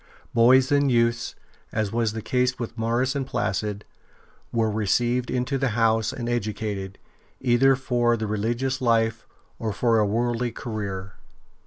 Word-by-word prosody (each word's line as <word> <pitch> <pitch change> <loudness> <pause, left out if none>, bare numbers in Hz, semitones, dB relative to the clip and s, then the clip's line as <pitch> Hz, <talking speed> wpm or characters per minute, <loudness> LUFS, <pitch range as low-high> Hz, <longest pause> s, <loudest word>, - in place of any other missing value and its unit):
Boys 125 +4 +5
and 145 -1 +3
youths, 115 0 +1 0.4
as 110 -2 -1
was 115 -2 0
the 110 -1 -5
case 125 0 +1
with 115 -1 -5
Maurus 120 +3 0
and 135 -2 -2
Placid, 105 -1 -2 0.7
were 115 -1 +1
received 120 +4 +1
into 125 +2 -1
the 135 - +1
house 115 -1 +2
and 120 -2 -5
educated, 105 -4 -3 0.4
either 130 +2 +4
for 120 -2 +1
the 110 - -3
religious 120 +6 -1
life 115 -2 +1 0.3
or 110 -1 -2
for 115 +1 +2
a 105 - +3
worldly 120 +2 0
career. 100 -5 -5
115 Hz, 145 wpm, -25 LUFS, 110-125 Hz, 0.7 s, Boys